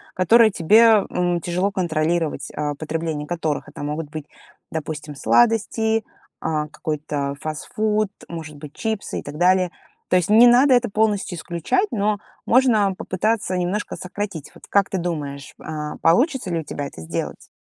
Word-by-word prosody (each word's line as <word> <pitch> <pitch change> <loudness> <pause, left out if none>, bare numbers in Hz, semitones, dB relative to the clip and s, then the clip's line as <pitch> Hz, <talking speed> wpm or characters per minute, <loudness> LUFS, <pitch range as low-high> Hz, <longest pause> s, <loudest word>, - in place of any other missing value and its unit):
которое 225 +5 +5
тебе, 215 +4 +5
м, 175 -1 0
тяжело 180 +4 0
контролировать. 170 -3 -1
А, 150 -1 -2
потребление 155 0 -3
которых- 160 -4 -2
это - - -8
могут 150 +1 -4
быть, 155 -2 -6 0.5
допустим, 150 -1 -5
сладости, 225 - +2 0.4
а, 155 -1 -1
какой-то 145 -2 -3
фастфуд, 210 +7 -1 0.2
может 160 -3 -7
быть, 145 0 -10
чипсы 220 -2 -3
и - - -8
так 145 +1 -8
далее. 180 0 +3 0.4
То - - +3
есть 180 +1 0
не 225 +3 +8
надо 255 +3 +6
это 245 -1 +2
полностью 205 -4 0
исключать, 175 - -1
но 210 0 +1 0.3
можно 225 -6 +4
попытаться 190 +1 -1
немножко 180 +4 -2
сократить. 185 -4 -5
Вот - - -17
как 200 -1 +3
ты 190 - -2
думаешь, 145 -5 -4
а, 150 -1 -5
получится 245 - +2
ли 165 - 0
у - - -5
тебя 145 -1 -5
это 80 - -11
сделать? 80 - -5
175 Hz, 155 wpm, -22 LUFS, 155-215 Hz, 0.5 s, не